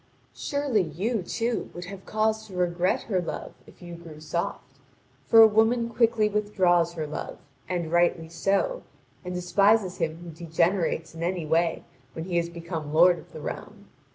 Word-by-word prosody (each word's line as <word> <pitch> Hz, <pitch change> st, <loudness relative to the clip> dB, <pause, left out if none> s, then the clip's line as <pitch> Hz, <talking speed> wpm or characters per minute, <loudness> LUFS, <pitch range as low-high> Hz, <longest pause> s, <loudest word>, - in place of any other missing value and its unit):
Surely 285 Hz, -7 st, 0 dB
you, 190 Hz, +8 st, -2 dB
too, 230 Hz, +6 st, -2 dB
would 175 Hz, 0 st, -6 dB
have 190 Hz, +1 st, -10 dB
cause 220 Hz, 0 st, 0 dB
to 190 Hz, -, -11 dB
regret 180 Hz, 0 st, +1 dB
her 190 Hz, -5 st, 0 dB
love 170 Hz, -, -6 dB
if -, -, -16 dB
you 175 Hz, 0 st, -8 dB
grew 165 Hz, -2 st, -11 dB
soft, 155 Hz, -3 st, -4 dB, 0.5 s
for 225 Hz, 0 st, +9 dB
a -, -, +9 dB
woman 225 Hz, +2 st, +2 dB
quickly 230 Hz, -2 st, +3 dB
withdraws 185 Hz, -5 st, +2 dB
her 160 Hz, -2 st, -3 dB
love, 150 Hz, +1 st, -6 dB, 0.3 s
and 170 Hz, -3 st, -2 dB
rightly 175 Hz, -1 st, +2 dB
so, 195 Hz, -, 0 dB, 0.4 s
and 180 Hz, 0 st, -5 dB
despises 190 Hz, +1 st, +2 dB
him 160 Hz, -1 st, -2 dB
who 175 Hz, -, -8 dB
degenerates 165 Hz, +1 st, 0 dB
in 165 Hz, -, -9 dB
any 175 Hz, -1 st, -1 dB
way 165 Hz, +2 st, +1 dB, 0.3 s
when 160 Hz, -, -5 dB
he 175 Hz, -2 st, -1 dB
has 170 Hz, 0 st, 0 dB
become 165 Hz, -3 st, -6 dB
lord 175 Hz, +2 st, +5 dB
of -, -, -16 dB
the 155 Hz, -, -9 dB
realm. 205 Hz, +5 st, -7 dB
180 Hz, 170 wpm, -26 LUFS, 170-210 Hz, 0.5 s, for